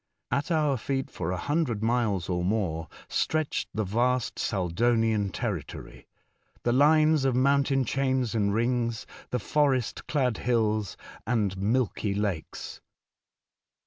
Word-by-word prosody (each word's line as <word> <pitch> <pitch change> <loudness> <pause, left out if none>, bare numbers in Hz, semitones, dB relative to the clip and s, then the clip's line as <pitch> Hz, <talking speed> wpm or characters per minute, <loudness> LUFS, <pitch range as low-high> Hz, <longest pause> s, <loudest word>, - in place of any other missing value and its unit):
At 140 +4 0
our 150 -5 +2
feet 135 +3 -3
for 90 0 -3
a 90 - -2
hundred 140 - -1
miles 110 -6 +1
or 90 -1 -1
more 90 -5 -1 0.2
stretched 155 -2 -1
the 110 - -1
vast 120 +5 0
Saldonian 110 +2 +1
territory, - - -5 0.6
the 120 - +2
lines 155 +2 +4
of 135 -2 +2
mountain 135 0 +3
chains 130 -2 0
and 100 -3 +1
rings, 115 0 0 0.3
and 125 - 0
forest 135 -2 0
clad 130 -6 +1
hills, 110 -4 0 0.3
and 105 -6 +1
milky 105 0 0
lakes. 100 -6 -4
120 Hz, 120 wpm, -27 LUFS, 105-135 Hz, 0.6 s, lines